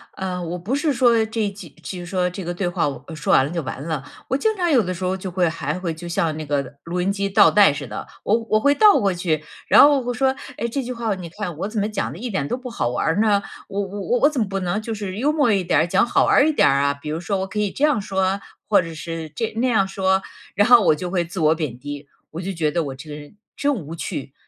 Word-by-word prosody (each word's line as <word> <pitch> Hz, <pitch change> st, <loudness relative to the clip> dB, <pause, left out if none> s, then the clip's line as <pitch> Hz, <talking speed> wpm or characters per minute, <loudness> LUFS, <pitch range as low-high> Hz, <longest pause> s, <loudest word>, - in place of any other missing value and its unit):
呃， 185 Hz, -1 st, -3 dB
我 170 Hz, +1 st, -4 dB
不 215 Hz, +10 st, -2 dB
是 295 Hz, +2 st, +1 dB
说 235 Hz, -3 st, +4 dB
这 220 Hz, -2 st, -1 dB
几 195 Hz, -4 st, -11 dB
就 180 Hz, 0 st, -6 dB
是 175 Hz, -, -7 dB
说 180 Hz, 0 st, 0 dB
这 185 Hz, +1 st, -7 dB
个 175 Hz, +1 st, -3 dB
对 180 Hz, +1 st, -2 dB
话， 175 Hz, -3 st, 0 dB
我 140 Hz, -1 st, -6 dB
呃 160 Hz, -, -7 dB
说 155 Hz, -, -1 dB
完 130 Hz, -, +5 dB
了 145 Hz, -, -5 dB
就 170 Hz, -1 st, -2 dB
完 135 Hz, -, -6 dB
了。 155 Hz, -4 st, -3 dB, 0.2 s
我 265 Hz, -, 0 dB
经 435 Hz, +7 st, +1 dB
常 350 Hz, -2 st, +1 dB
有 255 Hz, -8 st, +4 dB
的 185 Hz, 0 st, -3 dB
时 185 Hz, +1 st, -7 dB
候 185 Hz, +1 st, 0 dB
就 185 Hz, -1 st, -6 dB
会 180 Hz, -1 st, +2 dB
还 160 Hz, 0 st, -3 dB
会 170 Hz, -3 st, -3 dB
就 175 Hz, +2 st, -9 dB
像 165 Hz, -2 st, 0 dB
那 155 Hz, -, -5 dB
个 140 Hz, -1 st, -2 dB
录 180 Hz, +1 st, -3 dB
音 195 Hz, +2 st, +1 dB
机 200 Hz, 0 st, -2 dB
倒 195 Hz, -, +6 dB
带 205 Hz, -7 st, +5 dB
似 140 Hz, -2 st, -6 dB
的， 105 Hz, -, -6 dB, 0.2 s
我 215 Hz, +3 st, +3 dB
我 215 Hz, -, +4 dB
会 285 Hz, +4 st, +3 dB
倒 420 Hz, +3 st, +6 dB
过 195 Hz, -2 st, +1 dB
去， 165 Hz, -4 st, -1 dB, 0.2 s
然 -, -, +8 dB
后 290 Hz, -1 st, +6 dB
我 245 Hz, 0 st, -3 dB
说： 265 Hz, +1 st, +1 dB, 0.2 s
“哎， 235 Hz, -, -1 dB
这 265 Hz, +3 st, -3 dB
句 250 Hz, -, -5 dB
话 225 Hz, -4 st, -2 dB
你 180 Hz, -2 st, -8 dB
看， 175 Hz, -2 st, -5 dB
我 195 Hz, -, -2 dB
怎 215 Hz, 0 st, -3 dB
么 205 Hz, -, 0 dB
讲 215 Hz, -2 st, -3 dB
得 -, -, -9 dB
一 245 Hz, +6 st, -5 dB
点 170 Hz, -10 st, -2 dB
都 245 Hz, -, -2 dB
不 255 Hz, 0 st, -8 dB
好 230 Hz, -, -1 dB
玩 125 Hz, -, -2 dB
儿 165 Hz, +5 st, +1 dB
呢？ 205 Hz, -2 st, +3 dB, 0.3 s
我 200 Hz, -, -3 dB
我 200 Hz, +1 st, -5 dB
我 245 Hz, +5 st, 0 dB
我 290 Hz, -, +6 dB
怎 295 Hz, -4 st, -3 dB
么 215 Hz, -, 0 dB
不 195 Hz, 0 st, -3 dB
能 185 Hz, +4 st, -1 dB
就 225 Hz, +1 st, -4 dB
是 200 Hz, -2 st, -5 dB
幽 280 Hz, +7 st, +2 dB
默 290 Hz, -6 st, +2 dB
一 195 Hz, -3 st, +2 dB
点 160 Hz, -4 st, +2 dB
儿、 160 Hz, -, +2 dB
讲 205 Hz, -, +3 dB
好 -, -, +2 dB
玩 -, -, +3 dB
儿 285 Hz, -, +5 dB
一 -, -, +3 dB
点 300 Hz, -, +4 dB
儿 135 Hz, 0 st, +3 dB
啊？ 140 Hz, 0 st, +2 dB
“比 150 Hz, -, -6 dB
如 155 Hz, -, -2 dB
说- 195 Hz, +3 st, -2 dB
我 190 Hz, -, -2 dB
可 200 Hz, +2 st, -4 dB
以 205 Hz, -2 st, 0 dB
这 285 Hz, -, -4 dB
样 295 Hz, -7 st, +2 dB
说？ 190 Hz, 0 st, 0 dB, 0.3 s
或 205 Hz, -3 st, +5 dB
者 165 Hz, -1 st, -7 dB
是 160 Hz, 0 st, -6 dB
这 155 Hz, +9 st, -3 dB
那 250 Hz, +3 st, +2 dB
样 220 Hz, -6 st, +3 dB
说？ 190 Hz, 0 st, +1 dB, 0.3 s
然 205 Hz, +1 st, +4 dB
后 245 Hz, -2 st, +8 dB
我 165 Hz, -, +4 dB
就 180 Hz, +4 st, -5 dB
会 175 Hz, -3 st, 0 dB
自 170 Hz, +1 st, -5 dB
我 155 Hz, +1 st, +4 dB
贬 150 Hz, -7 st, -4 dB
低， 145 Hz, +2 st, -7 dB, 0.2 s
我 165 Hz, -, -6 dB
就 195 Hz, +1 st, -4 dB
觉 155 Hz, -4 st, 0 dB
得 170 Hz, 0 st, 0 dB
我 135 Hz, -2 st, -5 dB
这 145 Hz, +3 st, -11 dB
个 150 Hz, -, -6 dB
人 145 Hz, +5 st, -13 dB, 0.2 s
真 285 Hz, 0 st, +1 dB
无 165 Hz, -, -7 dB
趣， 145 Hz, -5 st, -5 dB
190 Hz, 325 characters per minute, -22 LUFS, 165-220 Hz, 0.3 s, 然